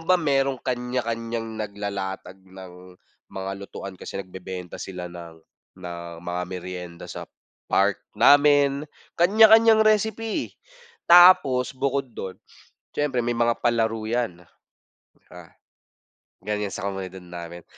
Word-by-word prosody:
ba 185 Hz, -, +5 dB
merong 135 Hz, -5 st, +1 dB
kanya-kanyang 115 Hz, -2 st, -3 dB
naglalatag 100 Hz, -2 st, -5 dB
ng 90 Hz, -1 st, -13 dB, 0.3 s
mga 95 Hz, 0 st, -5 dB
lutuan 100 Hz, -1 st, -8 dB
kasi -, -, -7 dB
nagbebenta 95 Hz, -1 st, -8 dB
sila 90 Hz, -2 st, -7 dB
ng 85 Hz, -2 st, -11 dB, 0.4 s
ng 85 Hz, -2 st, -8 dB
mga 90 Hz, 0 st, -3 dB
merienda 90 Hz, -1 st, -7 dB
sa -, -, -7 dB, 0.4 s
park 100 Hz, 0 st, +2 dB, 0.2 s
namin. 145 Hz, +4 st, +4 dB, 0.3 s
Kanya-kanyang 220 Hz, +4 st, +6 dB
recipe, 215 Hz, +1 st, 0 dB, 0.6 s
tapos 160 Hz, -8 st, +7 dB
bukod 135 Hz, +1 st, -1 dB
dun 95 Hz, -3 st, -7 dB, 0.6 s
siyempre 135 Hz, -5 st, -1 dB
may 120 Hz, -, -1 dB
mga 120 Hz, 0 st, +2 dB
palaro 115 Hz, -2 st, +1 dB
yan. 110 Hz, -6 st, -2 dB, 0.7 s
Tsaka 90 Hz, -2 st, -16 dB, 0.8 s
ganyan 105 Hz, -1 st, -3 dB
sa 100 Hz, -, -4 dB
komunidad 95 Hz, -1 st, -6 dB
namin. 85 Hz, -1 st, -9 dB
105 Hz, 110 wpm, -24 LUFS, 90-135 Hz, 0.8 s, tapos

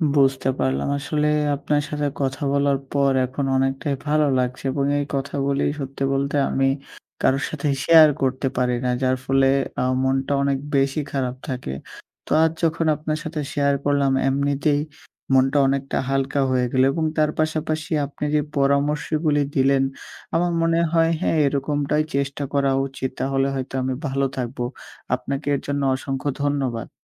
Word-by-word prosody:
বুঝতে 135 Hz, -1 st, +3 dB
পারলাম। 65 Hz, +1 st, 0 dB
আসলে 150 Hz, +1 st, -1 dB, 0.3 s
আপনার 145 Hz, +1 st, 0 dB
সাথে 150 Hz, -1 st, -1 dB
কথা 135 Hz, +3 st, -2 dB
বলার 140 Hz, -1 st, +2 dB, 0.2 s
পর 140 Hz, -1 st, +3 dB
এখন 135 Hz, +2 st, -3 dB
অনেকটাই 135 Hz, +2 st, 0 dB
ভালো 150 Hz, 0 st, +3 dB
লাগছে। 125 Hz, 0 st, -2 dB
এবং 140 Hz, 0 st, 0 dB
এই 145 Hz, -, -1 dB
কথাগুলি 140 Hz, 0 st, -1 dB, 0.2 s
সত্যি 135 Hz, 0 st, -4 dB
বলতে 140 Hz, +1 st, -1 dB
আমি 135 Hz, -, +1 dB, 0.6 s
কারো 135 Hz, +1 st, +3 dB
সাথে 150 Hz, -1 st, -3 dB, 0.2 s
শেয়ার 160 Hz, -2 st, +8 dB
করতে 135 Hz, 0 st, 0 dB
পারি 125 Hz, -1 st, +1 dB
না। -, -, +1 dB
যার 130 Hz, 0 st, +2 dB
ফলে 135 Hz, 0 st, +3 dB, 0.3 s
আ -, -, +1 dB, 0.2 s
মনটা 135 Hz, +1 st, 0 dB
অনেক 140 Hz, -1 st, +1 dB, 0.2 s
বেশি 135 Hz, +2 st, +2 dB
খারাপ 130 Hz, -2 st, -2 dB
থাকে 125 Hz, -, -4 dB, 0.5 s
তো -, -, -12 dB
আজ 160 Hz, -, +3 dB
যখন 165 Hz, 0 st, +1 dB
আপনার 155 Hz, +1 st, -3 dB
সাথে 155 Hz, -1 st, -4 dB
শেয়ার 140 Hz, -1 st, +2 dB
করলাম, 140 Hz, -1 st, +2 dB, 0.2 s
এমনিতেই 140 Hz, +2 st, +1 dB, 0.5 s
মনটা 135 Hz, +2 st, +4 dB
অনেকটা 135 Hz, 0 st, -1 dB
হালকা 135 Hz, +1 st, 0 dB
হয়ে 125 Hz, -1 st, +2 dB
গেল 130 Hz, 0 st, +3 dB
এবং 160 Hz, +3 st, -1 dB
তার 155 Hz, -1 st, +3 dB
পাশাপাশি 155 Hz, 0 st, -1 dB
আপনি 145 Hz, +1 st, -8 dB
যে 150 Hz, -, +3 dB, 0.2 s
পরামর্শগুলি 145 Hz, +2 st, +1 dB
দিলেন, 135 Hz, 0 st, +3 dB, 0.5 s
আমার 175 Hz, +1 st, +2 dB
মনে 165 Hz, 0 st, +2 dB
হয় 165 Hz, 0 st, +4 dB
হ্যাঁ, 160 Hz, -, +1 dB
এরকমটাই 145 Hz, +2 st, 0 dB
চেষ্টা 140 Hz, +1 st, -1 dB
করা 140 Hz, -1 st, +2 dB, 0.2 s
উচিত। 130 Hz, -1 st, -4 dB
তাহলে 135 Hz, 0 st, +1 dB
হয়তো 130 Hz, 0 st, -5 dB
আমি 130 Hz, 0 st, -1 dB
ভালো 135 Hz, +1 st, 0 dB
থাকবো। 125 Hz, 0 st, -3 dB, 0.5 s
আপনাকে 140 Hz, +3 st, -5 dB
এর -, -, -2 dB
জন্য 140 Hz, 0 st, -1 dB
অসংখ্য 135 Hz, +1 st, -3 dB
ধন্যবাদ। 135 Hz, -6 st, -1 dB
140 Hz, 155 wpm, -22 LUFS, 135-150 Hz, 0.6 s, শেয়ার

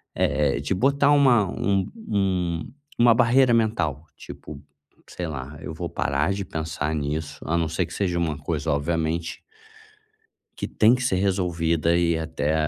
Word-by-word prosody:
eh, 75 Hz, -2 st, +1 dB
de 70 Hz, +7 st, -1 dB
botar 140 Hz, +8 st, +3 dB
uma 130 Hz, -7 st, +5 dB
um 100 Hz, 0 st, 0 dB, 0.2 s
um 90 Hz, -4 st, -1 dB, 0.3 s
uma 120 Hz, 0 st, +7 dB
barreira 125 Hz, +1 st, +4 dB
mental, 85 Hz, -, 0 dB
tipo, 70 Hz, -2 st, -10 dB, 0.5 s
sei 90 Hz, -, -5 dB
lá, 70 Hz, -1 st, -6 dB
eu 80 Hz, -, -6 dB
vou 85 Hz, +2 st, -5 dB
parar 70 Hz, +5 st, 0 dB
de 100 Hz, 0 st, -3 dB
pensar 80 Hz, -2 st, -3 dB
nisso, 75 Hz, +1 st, -3 dB
a 85 Hz, +2 st, 0 dB
não 85 Hz, -1 st, +1 dB
ser 85 Hz, +3 st, -1 dB
que -, -, -11 dB
seja 90 Hz, -4 st, -1 dB
uma 80 Hz, -4 st, -1 dB
coisa 75 Hz, -, -3 dB
obviamente 80 Hz, +3 st, -1 dB, 1.2 s
que -, -, -3 dB
tem 110 Hz, +2 st, +4 dB
que 130 Hz, 0 st, 0 dB
ser 120 Hz, -, +1 dB
resolvida, 85 Hz, -4 st, +1 dB
e 85 Hz, -1 st, +2 dB
até, 80 Hz, -2 st, -2 dB
85 Hz, 155 wpm, -24 LUFS, 80-100 Hz, 1.2 s, uma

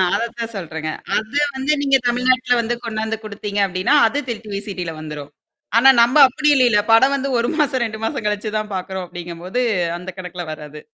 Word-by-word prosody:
அதத்தான் 230 Hz, 0 st, -4 dB
சொல்றேங்க. 160 Hz, -4 st, -5 dB, 0.3 s
அதான் 285 Hz, +7 st, 0 dB
வந்து 265 Hz, +3 st, +1 dB
நீங்க 275 Hz, -1 st, +4 dB
தமிழ்நாட்ல 250 Hz, +1 st, +2 dB
வந்து 235 Hz, +1 st, -2 dB
கொண்டாந்து 220 Hz, 0 st, -3 dB
குடுத்தீங்க 205 Hz, -1 st, -5 dB
அப்படின்னா, 185 Hz, +8 st, +1 dB
அது 270 Hz, +6 st, -3 dB
திருட்டு 220 Hz, -2 st, -6 dB
விசிடில 190 Hz, -4 st, -5 dB
வந்துரும். 150 Hz, -2 st, -8 dB, 0.5 s
ஆனா 265 Hz, +3 st, +7 dB
நம்ப 240 Hz, +6 st, +4 dB
அப்படி 300 Hz, +4 st, -2 dB
இல்லல. 245 Hz, -5 st, +4 dB
படம் 265 Hz, +5 st, +6 dB
வந்து 275 Hz, 0 st, -2 dB
1 235 Hz, -, 0 dB
மாசம், 280 Hz, -5 st, +1 dB
2 220 Hz, -1 st, -5 dB
மாசம் 265 Hz, -1 st, -3 dB
கழிச்சு 210 Hz, +1 st, -2 dB
தான் 215 Hz, -1 st, -4 dB
பார்க்கறோம் 190 Hz, 0 st, -4 dB
அப்படிங்கும்போது 175 Hz, +6 st, -5 dB, 0.4 s
அந்த 180 Hz, +1 st, -8 dB
கணக்குல 180 Hz, -1 st, -6 dB
வராது. 150 Hz, -1 st, -10 dB
220 Hz, 170 wpm, -20 LUFS, 185-250 Hz, 0.5 s, ஆனா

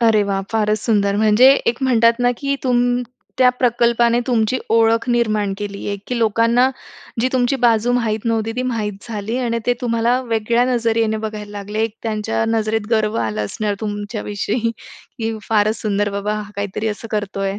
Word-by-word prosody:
अरे 225 Hz, -3 st, +4 dB
वाह! 195 Hz, -1 st, -1 dB
फारच 215 Hz, -1 st, +1 dB
सुंदर, 200 Hz, -3 st, +1 dB
म्हणजे 220 Hz, +4 st, +5 dB, 0.2 s
एक 235 Hz, +3 st, 0 dB
म्हणतात 230 Hz, -2 st, +3 dB
ना 245 Hz, -, +3 dB
की 280 Hz, -1 st, -1 dB
तुम 245 Hz, -1 st, +1 dB, 0.4 s
त्या 255 Hz, -1 st, +6 dB
प्रकल्पाने 235 Hz, -1 st, +2 dB
तुमची 245 Hz, 0 st, +1 dB
ओळख 230 Hz, +1 st, +3 dB
निर्माण 215 Hz, -4 st, +1 dB
केली 200 Hz, -1 st, -6 dB
आहे, 200 Hz, -, -2 dB
की 245 Hz, -1 st, -2 dB
लोकांना 230 Hz, +3 st, +3 dB, 0.5 s
जी 255 Hz, -, +2 dB
तुमची 255 Hz, +1 st, +1 dB
बाजू 230 Hz, +1 st, +3 dB
माहीत 225 Hz, -3 st, -1 dB
नव्हती, 225 Hz, -1 st, 0 dB
ती 255 Hz, -, 0 dB
माहीत 225 Hz, -5 st, -2 dB, 0.2 s
झाली. 220 Hz, +2 st, -3 dB
आणि 235 Hz, -2 st, -1 dB
ते 245 Hz, -, +3 dB
तुम्हाला 235 Hz, +1 st, +1 dB
वेगळ्या 230 Hz, 0 st, +1 dB
नजरेने 225 Hz, -1 st, +1 dB
बघायला 215 Hz, -1 st, -6 dB
लागले. 210 Hz, +3 st, -2 dB, 0.2 s
त्यांच्या 220 Hz, 0 st, -1 dB
नजरेत 220 Hz, -1 st, 0 dB
गर्व 220 Hz, -1 st, +1 dB
आला 105 Hz, -1 st, -2 dB
असणार 205 Hz, -, -2 dB
तुमच्या 205 Hz, 0 st, -4 dB
विषयी, 215 Hz, +3 st, -2 dB, 0.5 s
की 225 Hz, 0 st, -2 dB
"फारच 215 Hz, 0 st, +2 dB
सुंदर 205 Hz, -1 st, 0 dB
बाबा, 200 Hz, +1 st, -2 dB
हा 205 Hz, -1 st, -9 dB
काहीतरी 205 Hz, +2 st, -2 dB
असं 220 Hz, +2 st, -6 dB
करतोय." 195 Hz, -1 st, -2 dB
225 Hz, 165 wpm, -19 LUFS, 210-235 Hz, 0.5 s, त्या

